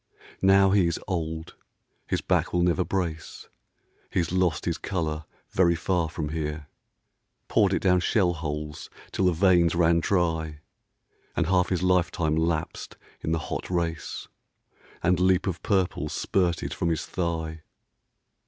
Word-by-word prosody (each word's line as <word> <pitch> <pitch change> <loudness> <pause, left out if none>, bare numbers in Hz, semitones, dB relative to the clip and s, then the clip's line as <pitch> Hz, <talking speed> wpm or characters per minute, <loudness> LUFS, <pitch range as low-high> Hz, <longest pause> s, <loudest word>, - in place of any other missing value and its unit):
Now 95 0 +5
he 95 -3 +4
is 85 - -1
old; 80 -3 -3 0.5
his - - 0
back - - +1
will 90 -1 +2
never 90 +1 +2
brace; 85 -5 -4 0.6
He's 85 -2 0
lost 90 -4 +1
his 85 -2 -1
colour 80 -5 -2 0.3
very 85 -2 +3
far 85 -1 0
from 75 -2 -4
here, 75 -1 -3 0.8
Poured - - +3
it - - 0
down 90 -1 +4
shell 90 -1 +2
holes 75 -1 -5 0.2
till 95 - 0
the 90 - +5
veins 85 -1 +4
ran 85 -1 +4
dry, 80 -4 0 0.7
And - - +1
half 90 +1 +2
his 90 -1 0
life 90 -2 +3
time 80 -2 0
lapsed 80 0 -2 0.2
in 80 - -2
the 80 - +2 0.2
hot - - -4
race, 85 -4 -2 0.8
And 90 0 +3
leap 95 0 +3
of 90 -4 -3
purple 90 -6 0
spurted 90 -1 0
from 85 - -1
his 80 -2 -1
thigh. 80 -2 -3
85 Hz, 145 wpm, -26 LUFS, 80-90 Hz, 0.8 s, Now